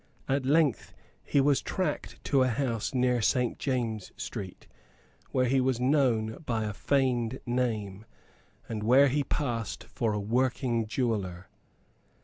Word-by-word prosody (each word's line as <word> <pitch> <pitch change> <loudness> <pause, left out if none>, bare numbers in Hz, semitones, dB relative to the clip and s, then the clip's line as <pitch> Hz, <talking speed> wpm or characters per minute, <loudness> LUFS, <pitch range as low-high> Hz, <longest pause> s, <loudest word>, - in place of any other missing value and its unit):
At 135 -1 0
length 145 -4 +2 0.3
he 145 - +1
was 140 0 +3
tracked 185 - -3
to 135 -2 +2
a 130 - +4
house 120 -3 -1
near 125 -2 +2
Saint 125 +2 +1
James's 115 -6 -2
Street, 95 -3 -6 0.6
where 130 -1 +1
he 130 +1 +2
was 130 -2 +1
known 125 -5 +2
by 115 -6 -1
a 105 -1 -3
feigned 130 0 0
name, 110 -5 -2 0.6
and 110 -2 -4
where 130 +6 +5
he 145 +2 +1
passed 120 -8 -3
for 110 -2 -2
a 105 - -1
working 120 +1 0
jeweller. 100 -7 -2
125 Hz, 135 wpm, -29 LUFS, 110-135 Hz, 0.6 s, where